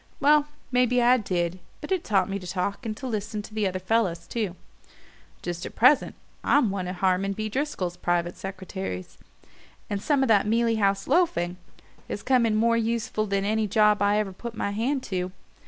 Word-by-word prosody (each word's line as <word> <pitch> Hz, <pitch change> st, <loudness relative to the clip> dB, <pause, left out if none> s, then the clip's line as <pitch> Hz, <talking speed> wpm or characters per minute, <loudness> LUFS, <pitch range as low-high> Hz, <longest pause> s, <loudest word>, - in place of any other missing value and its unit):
Well, 295 Hz, +1 st, +4 dB, 0.2 s
maybe 250 Hz, 0 st, +3 dB
I 245 Hz, +1 st, +5 dB
did 180 Hz, -5 st, -2 dB, 0.2 s
but 300 Hz, -, -8 dB
it 375 Hz, -3 st, +1 dB
taught 200 Hz, -3 st, +2 dB
me 200 Hz, 0 st, -3 dB
to 180 Hz, -, -9 dB
talk, 200 Hz, +6 st, -2 dB
and 215 Hz, -1 st, -4 dB
to -, -, -7 dB
listen 215 Hz, -2 st, -3 dB
to 215 Hz, -, -12 dB
the 215 Hz, -2 st, +1 dB
other 185 Hz, 0 st, -2 dB
fellows 185 Hz, -3 st, 0 dB
too. 210 Hz, -6 st, -3 dB, 0.9 s
Just 175 Hz, 0 st, -4 dB
at -, -, -7 dB
present 255 Hz, +5 st, +4 dB, 0.3 s
I'm 265 Hz, -8 st, +3 dB
one 190 Hz, -2 st, -3 dB
of 180 Hz, -, -4 dB
Harmon 190 Hz, +2 st, +1 dB
B. 215 Hz, +2 st, -3 dB
Driscoll's 210 Hz, -, -2 dB
private 175 Hz, 0 st, 0 dB
secretaries, 190 Hz, -, -6 dB, 0.7 s
and 200 Hz, -1 st, -1 dB
some 280 Hz, +3 st, +2 dB
of -, -, +1 dB
that 210 Hz, -2 st, +4 dB
Mealey 230 Hz, +1 st, +2 dB
House 195 Hz, -1 st, +1 dB
loafing 185 Hz, -, +1 dB, 0.5 s
has 205 Hz, -, -5 dB
come 250 Hz, -3 st, +3 dB
in 215 Hz, -, +1 dB
more 230 Hz, +2 st, +3 dB
useful 225 Hz, -1 st, -1 dB
than 195 Hz, 0 st, 0 dB
any 215 Hz, +1 st, +1 dB
job 210 Hz, 0 st, +3 dB
I 205 Hz, +1 st, +3 dB
ever 205 Hz, -3 st, -1 dB
put 235 Hz, +4 st, -7 dB
my 200 Hz, -, -2 dB
hand 255 Hz, +6 st, -1 dB
to. 185 Hz, -1 st, -3 dB
210 Hz, 190 wpm, -26 LUFS, 190-235 Hz, 0.9 s, I